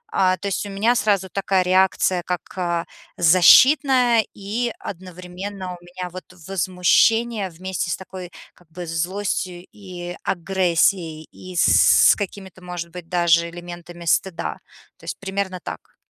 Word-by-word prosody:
А, 185 -1 +3
то 200 - -5
есть 195 - -2
у - - -8
меня 210 +5 +2
сразу 205 -5 +1
такая 195 -1 +1
реакция 185 0 +2
как, 180 -1 -3
а, 170 -2 -1 0.3
защитная. 240 - +6
И 220 +4 -3
одновременно 185 +1 -8
у 175 - -13
меня 180 +1 -7
вот 185 -2 -8 0.2
возмущение 195 +4 +2
вместе 180 +1 -4
с - - -1
такой, 185 -2 -9 0.2
как 175 -3 -25
бы, 175 +2 -7
злостью 180 +1 -3
и 180 -3 -8
агрессией, 170 -3 0
и 185 -1 -11
с - - +6
какими-то, 190 -2 -7
может 175 -1 -6
быть, 175 -1 -10
даже 170 -1 +3
элементами 175 0 -10
стыда. 170 0 -1 0.4
То - - -24
есть - - -5
примерно 190 -1 -3
так. - - -9
185 Hz, 140 wpm, -22 LUFS, 175-195 Hz, 0.4 s, защитная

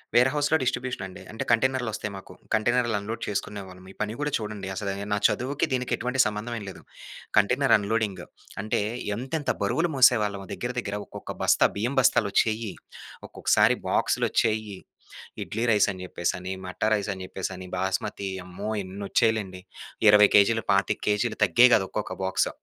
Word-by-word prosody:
వేర్‌హౌస్‌లో 145 +5 +3
distribution 125 -4 -2
అండి. 95 - -11
అంటే 110 - -4
కంటైనర్‌లు 125 +1 +2
వస్తాయి 105 0 -4
మాకు. 95 - -12 0.2
కంటైనర్‌లు 120 +1 +2
అన్‌లోడ్ 110 +3 -6
చేసుకునేవాళ్ళమి. 95 -2 -5
ఈ - - -32
పని 105 0 -1
గూడా 150 0 -1
చూడండి. 105 -3 -6
అసలు 100 +1 -3
ఏహ్ 100 +1 -6
నా - - +2
చదువుకి 135 +4 -1
దీనికి 125 -1 -1
ఎటువంటి 125 +2 -3
సంబంధం 105 +3 -3
ఏం - - -8
లేదు. 95 - -11 0.6
Container 125 +5 +4
unloading. 105 -1 -2 0.4
అంటే 105 0 -1 0.4
ఎంతెంత 135 +4 -3
బరువులు 165 +11 +1
మోసేవాళ్ళమో 105 -7 +3
దగ్గర 125 +1 -4
దగ్గర 105 -3 -4
ఒక్కొక్క - - -8
బస్తా - - +5
బియ్యం 120 +7 -1
బస్తాలు 120 -4 +3
వచ్చేయి. 110 -1 +1 0.6
ఒక్కొక్కసారి - - +3
బాక్సులొచ్చేయి. 110 -2 0 0.6
ఇడ్లీ 110 +2 -3
రైస్ 105 -3 +4
అని 95 -1 -8
చెప్పేసి 85 -1 -2
అని, 90 +1 -6
మట్టా 90 +3 -2
రైస్ 105 -1 -1
అని 95 -1 -8
చెప్పేసి 95 +1 -5
అని, 95 0 -9
బాస్మతి 95 +1 -2 0.2
అమ్మో! 95 +4 -6
ఎన్నొచ్చేయి‌లేండి. 100 0 -1 0.5
20 105 0 +8
కేజీలు 110 +2 +4
25 100 -1 +1
కేజీలు 105 +2 +1
తగ్గేయి 125 +1 +6
గాదు 95 - +4
ఒక్కొక్క 105 - -4
బాక్స్. 95 0 +1
105 Hz, 155 wpm, -26 LUFS, 100-120 Hz, 0.6 s, 20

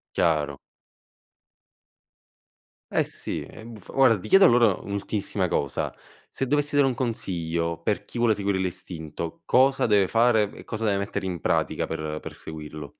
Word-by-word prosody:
Chiaro. 75 -4 +1 2.3
Eh, - - +2
sì, - - -5
ehm, 110 0 -10
f 95 - -12
guarda, 130 -4 +5
ti 110 - -8
chiedo 195 - +7
allora 120 -5 +5
un'ultimissima 100 -1 -2
cosa. 70 -4 -1 0.4
Se 135 - -2
dovessi 145 +2 +1
dare 145 -1 +5
un 130 - +1
consiglio, 85 -9 -2
per 105 +4 -1
chi 120 - -7
vuole 115 -3 +3
seguire 100 -1 -1
l'istinto. 85 -3 -5
Cosa 135 -1 +3
deve 100 -3 +4
fare 115 -3 +3
e - - -11
cosa 115 -1 -3
deve 100 -2 +2
mettere 100 -1 -3
in 90 -2 -3
pratica - - 0
per 75 0 -4
per - - -8
seguirlo? 75 -2 -8
100 Hz, 150 wpm, -25 LUFS, 85-115 Hz, 2.3 s, chiedo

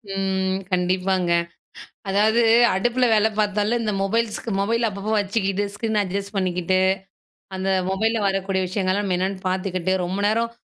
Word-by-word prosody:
ம், 190 -1 0 0.2
கண்டிப்பாங்க. 185 0 +1 0.8
அதாவது 215 +4 +3 0.3
அடுப்புல 240 +6 +1
வேலை 220 0 +3
பாத்தாலே, 210 +2 +1
இந்த 215 - -1
மொபைல்-, 225 +3 -1
மொபைல் 230 +3 0
அப்பப்போ 200 +2 -5
வச்சுக்கிட்டு, 195 -1 -1
ஸ்க்ரீன் 220 +1 -2
அட்ஜஸ்ட் 200 +1 -4
பண்ணிக்கிட்டு, 185 -1 0 0.8
அந்த 190 0 -3 0.2
மொபைல்ல 220 +4 0
வரக்கூடிய 195 -1 0
விஷயங்கள்லாம் 190 +1 -1
நம்ம 185 -2 0
என்னன்னு 190 +1 -2
பாத்துக்கிட்டு, 185 -1 -1
ரொம்ப 185 +3 -3
நேரம் 230 +2 +1
195 Hz, 130 wpm, -22 LUFS, 190-215 Hz, 0.8 s, அதாவது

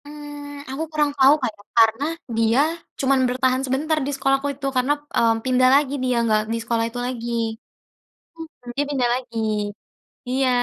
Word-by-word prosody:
Eee, 290 -1 -9
aku 280 +4 -3
kurang 300 -2 +1
tau, 270 +1 +7
Kak, 255 - 0
ya, - - -16
karena 225 +4 +4 0.3
dia 230 +2 +3 0.4
cuman 270 0 +3
bertahan 255 +1 +1
sebentar 295 +5 0
di 285 - -2
sekolahku 270 +1 +1
itu 275 - -7
karena, 255 +3 +3 0.2
mmm, 225 -1 +3
pindah 255 0 +4
lagi 280 -1 +2
dia 250 -1 +1
enggak 215 -2 +2
di - - 0
sekolah 230 0 0
itu 245 +1 -6
lagi 240 -2 -4 1.1
heeh 325 -6 -12
dia 285 - +1
pindah 260 -4 +1
lagi 245 -2 -6 0.9
Iya. 260 +1 +1
260 Hz, 165 wpm, -22 LUFS, 245-285 Hz, 1.1 s, tau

